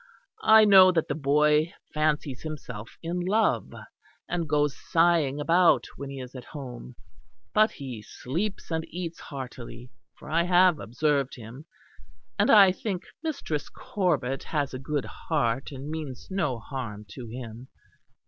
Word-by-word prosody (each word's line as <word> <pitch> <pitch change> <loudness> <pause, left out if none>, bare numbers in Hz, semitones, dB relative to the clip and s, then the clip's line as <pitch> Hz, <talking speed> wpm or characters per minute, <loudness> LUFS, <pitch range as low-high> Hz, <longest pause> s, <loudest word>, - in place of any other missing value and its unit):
I 220 0 +8
know 190 -2 +8
that 165 -2 0
the - - +1
boy 150 +2 +2 0.2
fancies 150 -4 0
himself 125 -8 -7
in 170 +2 -2
love; 205 +5 +1 0.6
and 170 -3 -2
goes 145 -1 +2
sighing 165 -4 +2
about 165 +2 +4
when 140 0 -7
he 135 -1 -7
is 125 -1 -8
at 125 -2 -8
home; 125 -4 -9 0.6
but 215 +1 +5
he 130 -6 -7
sleeps 170 - -4
and 160 0 0
eats 170 -1 -5
heartily, 125 -3 -8 0.3
for - - -13
I 160 +2 +2
have 180 -2 +4
observed 140 +2 0
him; 120 +5 -11 0.7
and 205 - +3
I 200 -3 +8
think 190 -1 -4 0.2
Mistress 280 - -3
Corbet 175 - -1
has 145 -4 -2
a 130 - -4
good 140 +1 -2
heart 135 -5 -2
and 135 0 -7
means 150 -5 -6
no 160 -10 0
harm 115 -4 -6
to 125 -3 -9
him. 120 +1 -8
150 Hz, 145 wpm, -27 LUFS, 130-175 Hz, 0.7 s, I